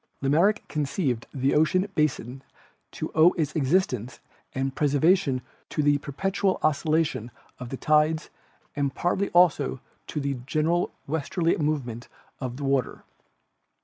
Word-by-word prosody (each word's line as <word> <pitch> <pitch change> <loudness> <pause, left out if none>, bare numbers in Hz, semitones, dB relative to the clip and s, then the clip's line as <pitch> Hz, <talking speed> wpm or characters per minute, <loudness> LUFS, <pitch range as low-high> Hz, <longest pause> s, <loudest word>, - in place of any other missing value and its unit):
Lamarck 170 +11 +2
conceived 140 - -2
the 135 0 0
ocean 185 +6 +3
basin 135 -5 -1 0.5
to - - -5
owe 160 +3 +6
its 155 -2 -2
existence 135 - 0 0.4
and 135 0 -1
preservation 145 -1 +2 0.3
to 150 - -1
the 145 0 +3
perpetual 190 +7 -1
oscillation 155 -5 +1 0.3
of 125 -1 -7
the 135 - -5
tides 155 +2 +2 0.4
and 140 -2 -1
partly 190 +3 0
also 160 -7 +3 0.3
to 150 - -3
a 140 -1 -1
general 160 +5 +1
westerly 160 +3 0
movement 135 -7 -2 0.3
of 125 -2 -5
the 145 - -6
water. 135 -2 0
150 Hz, 125 wpm, -26 LUFS, 135-165 Hz, 0.5 s, owe